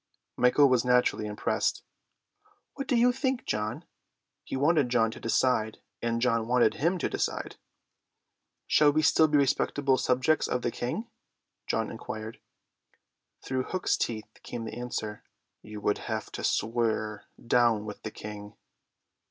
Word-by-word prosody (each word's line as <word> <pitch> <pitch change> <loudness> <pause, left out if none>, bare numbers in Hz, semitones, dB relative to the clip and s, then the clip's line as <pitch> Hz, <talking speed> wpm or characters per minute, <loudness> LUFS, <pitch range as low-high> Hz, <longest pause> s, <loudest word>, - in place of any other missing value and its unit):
Michael 125 +3 +5
was 125 -3 +3
naturally 125 -3 +2
impressed. 105 0 -1 0.9
"What 275 -1 -5
do 255 - +2
you 240 +1 +5
think, 260 0 -1
John?" 105 0 -3 0.6
He - - -5
wanted 145 -1 +3
John 115 -2 +2
to - - -10
decide, 115 -2 +1 0.2
and 115 0 0
John 115 -2 +1
wanted 120 -2 +3
him 170 +5 0
to - - -1
decide. - - -3 1.1
"Shall 150 -1 +5
we 155 +2 +1
still 160 0 +5
be 150 -1 +3
respectful 140 -1 +2
subjects 130 +5 +2
of 125 - -2
the 120 - 0
King?" 170 - -4 0.6
John - - -1
inquired. 110 +1 -7 1.1
Through 130 -1 -1
Hook's 185 -1 0
teeth 110 -2 -4
came 120 -2 -6
the 110 - -6
answer: 110 -3 -5 0.4
"You 105 0 -9
would 105 - +1
have - - -4
to - - -6
swear, 110 -2 -1
'Down 115 -3 +2
with 105 -1 -8
the 110 - -5
King. 105 -1 -9
120 Hz, 145 wpm, -28 LUFS, 110-140 Hz, 1.1 s, Michael